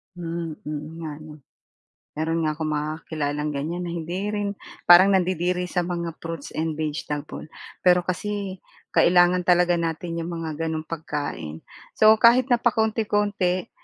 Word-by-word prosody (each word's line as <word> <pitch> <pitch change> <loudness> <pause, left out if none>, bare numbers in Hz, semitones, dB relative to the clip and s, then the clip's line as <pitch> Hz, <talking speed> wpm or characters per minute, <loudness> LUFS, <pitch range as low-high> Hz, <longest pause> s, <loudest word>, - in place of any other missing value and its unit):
Hmm. 170 -2 -4 0.2
Oo 150 0 -4
nga 155 -2 -6
ano. 155 -1 -12 0.8
Meron 165 +1 0
nga 155 - +1
akong 155 -1 -2
mga 150 +1 -1 0.2
kakilalang 150 -1 -2
ganyan 160 +6 -3
na 170 - -4
hindi 170 +2 -4 0.2
rin 205 -1 -1 0.3
parang 185 +3 +7
nandidiri 180 -1 +1
sa 180 -2 0
mga 170 -2 -4
fruits 165 -3 -6
and 160 0 -1
vegetable, 150 -1 -4 0.4
pero 180 0 +6
kasi 195 +1 -3 0.3
kailangan 175 0 +4
talaga 175 -1 +4
natin 165 +1 -3
'yong 165 - -3 0.2
mga 160 - -3 0.2
gano'n 160 -1 -2
pagkain. 145 - -5 0.3
So, 215 0 +6
kahit 240 +3 +5
na 245 - +5
pakonti-konti, 210 -4 0
170 Hz, 145 wpm, -24 LUFS, 155-185 Hz, 0.8 s, parang